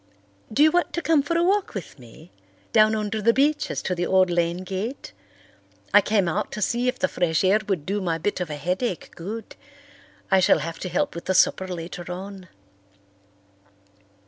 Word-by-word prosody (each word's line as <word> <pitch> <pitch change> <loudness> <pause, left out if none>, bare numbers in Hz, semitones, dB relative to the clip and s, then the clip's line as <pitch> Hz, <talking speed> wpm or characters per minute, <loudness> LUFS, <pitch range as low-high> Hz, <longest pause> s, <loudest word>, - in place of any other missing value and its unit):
Do 275 +7 +4
you 310 - +6
want 355 +1 +1
to 340 - -2
come 315 -2 +4
for 335 +4 -1
a 340 - +2
walk 390 - +1
with 170 -6 -7
me—down 130 - -1
under 215 0 -2
the 230 +2 +4
beeches 295 +2 +1
to 185 - -1
the 175 0 -2
old 185 -1 +3
lane 170 +1 0
gate? 195 +8 -5 0.8
I 205 - +8
came 200 -2 +1
out 195 +6 -2
to - - -4
see 240 +5 0
if 250 - 0
the - - +1
fresh 160 -4 0
air 195 +3 +4
would 185 -8 -1
do 200 +2 -1
my 170 -3 -1
bit 185 +4 -2
of 175 - -3
a 150 - -4
headache 180 - -3
good. 210 +6 -7 0.8
I 190 - +6
shall 185 - +5
have 165 -1 -5
to 185 - -4
help 290 +9 0
with 170 - -8
the 190 - 0
supper 190 +1 +3
later 175 0 -6
on." 190 +1 -8
190 Hz, 190 wpm, -24 LUFS, 175-220 Hz, 0.8 s, I